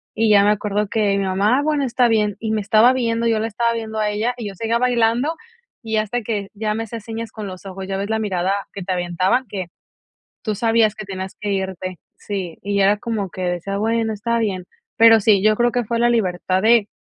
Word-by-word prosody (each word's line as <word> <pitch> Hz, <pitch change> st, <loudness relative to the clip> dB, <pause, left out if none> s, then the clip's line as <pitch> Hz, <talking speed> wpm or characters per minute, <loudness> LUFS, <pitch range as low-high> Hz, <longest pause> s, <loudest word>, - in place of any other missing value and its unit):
Y 225 Hz, 0 st, +2 dB
ya 205 Hz, -1 st, +6 dB
me 205 Hz, -, +4 dB
acuerdo 210 Hz, 0 st, -1 dB
que 205 Hz, -3 st, +1 dB
mi 200 Hz, -, 0 dB
mamá: 200 Hz, +7 st, +2 dB
"Ah, -, -, -1 dB
bueno, 295 Hz, -2 st, +1 dB
está 245 Hz, 0 st, +2 dB
bien", 210 Hz, -2 st, +1 dB
y 220 Hz, -1 st, -3 dB
me 220 Hz, -, +1 dB
estaba 215 Hz, +4 st, +5 dB
viendo, 230 Hz, -2 st, 0 dB
yo 225 Hz, -1 st, +2 dB
la 220 Hz, -, -1 dB
estaba 235 Hz, +1 st, 0 dB
viendo 220 Hz, -1 st, -4 dB
a 210 Hz, -, +1 dB
ella, 215 Hz, +4 st, -1 dB
y 230 Hz, -, -5 dB
yo 195 Hz, -, -10 dB
seguía 230 Hz, +4 st, 0 dB
bailando, 245 Hz, +5 st, +1 dB, 0.5 s
y 220 Hz, -1 st, -2 dB
hasta 215 Hz, +3 st, -1 dB
que 205 Hz, -3 st, -3 dB
ya 215 Hz, 0 st, -2 dB
me 225 Hz, -, -2 dB
hacía 225 Hz, +1 st, -6 dB
señas 225 Hz, +1 st, -6 dB
con 215 Hz, -2 st, -7 dB
los 185 Hz, 0 st, -9 dB
ojos, 190 Hz, 0 st, -7 dB
ya 195 Hz, -, -3 dB
ves 200 Hz, +2 st, -3 dB
la 220 Hz, 0 st, 0 dB
mirada 190 Hz, -3 st, 0 dB, 0.2 s
que 200 Hz, -, -6 dB
te 185 Hz, -, -4 dB
aventaba, 185 Hz, +8 st, 0 dB
que 190 Hz, -3 st, -4 dB, 0.8 s
tú 215 Hz, -, -1 dB
sabías 225 Hz, -1 st, +2 dB
que 215 Hz, -1 st, -8 dB
tenías 190 Hz, -1 st, -6 dB
que 205 Hz, -, -3 dB
irte. 190 Hz, -2 st, -4 dB, 0.2 s
Sí, 190 Hz, -5 st, -5 dB
y 200 Hz, 0 st, 0 dB
era 200 Hz, +1 st, +4 dB
como 210 Hz, -4 st, -3 dB
que 185 Hz, -, -7 dB
decía, 180 Hz, +2 st, -2 dB
bueno, 225 Hz, +1 st, 0 dB
está 235 Hz, +3 st, -1 dB
bien. 195 Hz, -5 st, -2 dB, 0.3 s
Pero 225 Hz, 0 st, +7 dB
sí, 200 Hz, -2 st, +4 dB
yo 215 Hz, +1 st, +4 dB
creo 240 Hz, +1 st, +2 dB
que 245 Hz, -1 st, 0 dB
fue 230 Hz, +2 st, -2 dB
la 240 Hz, 0 st, +4 dB
libertad 185 Hz, -3 st, 0 dB
de 225 Hz, -2 st, +4 dB
215 Hz, 235 wpm, -20 LUFS, 195-230 Hz, 0.8 s, Pero